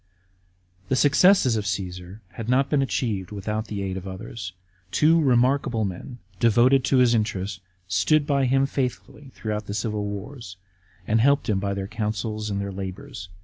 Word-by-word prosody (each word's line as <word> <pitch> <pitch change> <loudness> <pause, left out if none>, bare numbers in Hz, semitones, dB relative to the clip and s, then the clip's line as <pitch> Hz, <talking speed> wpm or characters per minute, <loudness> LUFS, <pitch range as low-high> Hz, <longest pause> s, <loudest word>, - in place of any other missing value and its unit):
§ - - -42 0.8
2. - - -28
The 130 - +2
successes 145 - +5
of 105 -2 -2
Caasar 90 0 -4
had 110 +4 -7
not 135 +2 +2
been 145 -2 +3
achieved 110 -8 -1
without 105 +2 -4
the 100 -2 -4
aid 95 -1 -3
of 95 0 -7
others. 95 0 -7 0.4
Two 160 - +4
remarkable 125 -3 +2
men, 100 +7 -6 0.2
devoted 120 +4 +4
to 135 - +3
his 125 -2 +5
interests, 100 -3 -1 0.3
stood 95 - +2
by 140 -2 +2
him 135 +2 +3
faithfully 135 +1 -4
throughout 105 -1 -4
the 100 - -4
civil 105 -1 -2
wars, 100 -1 -7 0.5
and 110 +3 +2
helped 140 +1 +3
him 100 -3 +2
by 100 0 -2
their 100 -1 -3
counsels 110 0 -3
and 100 -1 -2
their 100 0 -3
lahours. 95 +3 -7
110 Hz, 175 wpm, -24 LUFS, 100-130 Hz, 0.8 s, successes